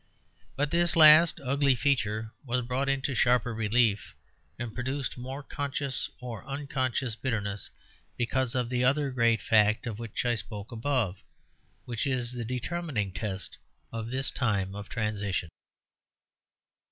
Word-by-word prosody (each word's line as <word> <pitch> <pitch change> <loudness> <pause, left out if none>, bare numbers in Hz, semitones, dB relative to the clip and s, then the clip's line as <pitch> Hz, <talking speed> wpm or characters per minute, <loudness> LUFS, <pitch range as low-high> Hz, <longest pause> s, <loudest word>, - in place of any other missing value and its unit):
But 145 +1 -1
this 170 -1 +3
last 155 +1 +9
ugly 140 0 +3
feature 110 -5 0
was 125 -2 -1
brought 130 +3 -1
into 135 0 0
sharper 125 -1 +2
relief, 110 -1 +1 0.4
and 120 -2 -5
produced 130 +2 -3
more 130 +3 -6
conscious 140 -1 -2
or 120 -4 -7
unconscious 135 -4 -2
bitterness, 105 -5 -3 0.5
because 125 +1 0
of 125 -2 0
that 125 0 +1
other 140 +2 +2
great 115 -2 +2
fact 110 0 +3
of 115 -3 -5
which 115 +1 -4
I 120 - +3
spoke 105 -1 -6
above, 115 -5 -1 0.6
which 120 +3 -2
is 125 -3 -1
the 120 -1 -4
determining 125 - -3
test 100 -1 -5 0.3
of 115 0 -5
this 130 +2 0
time 100 -6 0
of 100 0 -8
transition. 100 -6 -2
125 Hz, 135 wpm, -28 LUFS, 110-135 Hz, 0.6 s, last